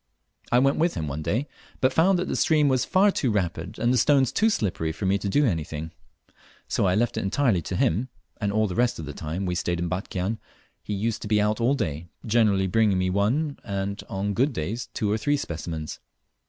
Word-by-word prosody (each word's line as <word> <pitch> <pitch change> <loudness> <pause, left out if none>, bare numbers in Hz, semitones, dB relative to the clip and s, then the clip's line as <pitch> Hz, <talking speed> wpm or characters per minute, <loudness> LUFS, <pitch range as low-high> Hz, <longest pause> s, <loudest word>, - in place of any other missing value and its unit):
I 120 - +5
went 135 +2 +3
with 165 +2 +1
him 80 - -3
one 75 +2 -4
day, 120 - -1 0.3
but 130 -1 +2
found 180 +6 +4
that 180 - -2
the - - -2
stream 155 -3 +3
was 130 -2 +2
far 200 +2 +4
too 135 - 0
rapid 95 -2 -2
and 120 +2 +2
the 125 - +3
stones 135 0 +4
too 220 +2 +3
slippery 90 - -1
for 95 - -5
me 95 +1 +2
to 100 - -3
do 145 +8 +3
anything, 80 - -2 0.8
so - - +1
I 90 - +2
left 120 +2 0
it - - 0
entirely 105 -2 +1
to - - -4
him, 110 +11 +1 0.3
and 100 -2 -1
all 110 +1 +2
the 95 - -3
rest 120 +5 +1
of 80 - -6
the 75 - -6
time 80 +6 -4
we 90 - -1
stayed 85 -1 -1
in 85 0 -2
Batchian 95 +3 -3 0.4
he 105 - -4
used 110 +3 -2
to - - -5
be 105 0 +3
out 105 +2 +1
all 125 +4 +3
day, 85 - -3 0.2
generally 105 -4 +3
bringing 100 +1 +2
me 95 0 +1
one, 130 +10 0
and 100 -1 -3
on 100 +1 -2
good 130 +7 +1
days 110 +6 -4
two 105 -2 0
or 110 - 0
three 145 +5 +1
specimens. 80 - -5
105 Hz, 225 wpm, -25 LUFS, 90-125 Hz, 0.8 s, I